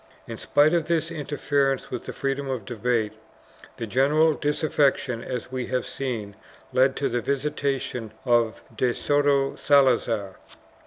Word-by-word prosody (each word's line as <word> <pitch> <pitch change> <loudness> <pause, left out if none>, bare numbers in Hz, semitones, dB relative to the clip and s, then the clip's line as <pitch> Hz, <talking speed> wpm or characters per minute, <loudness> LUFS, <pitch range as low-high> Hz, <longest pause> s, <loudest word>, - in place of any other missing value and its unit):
2 - - -10
In - - -5
spite 150 +3 +3
of 170 -3 +2
this 165 0 0
interference 145 -3 -1
with 125 - -5
the - - -5
freedom 135 0 -2
of 125 -6 -3
debate, 115 -1 -1 0.6
the 115 - -3
general 145 +7 +3
disaffection, 145 -5 0
as 125 0 -5
we 130 -1 -3
have 125 -1 -1
seen, 115 -7 -4 0.4
led 130 +1 +4
to 140 - 0
the 120 0 -1
visitation 135 -3 -2
of 120 -3 +2
de 120 +1 +1
Soto 145 -1 +2
Salazar. 120 -8 +2
135 Hz, 145 wpm, -25 LUFS, 120-145 Hz, 0.6 s, led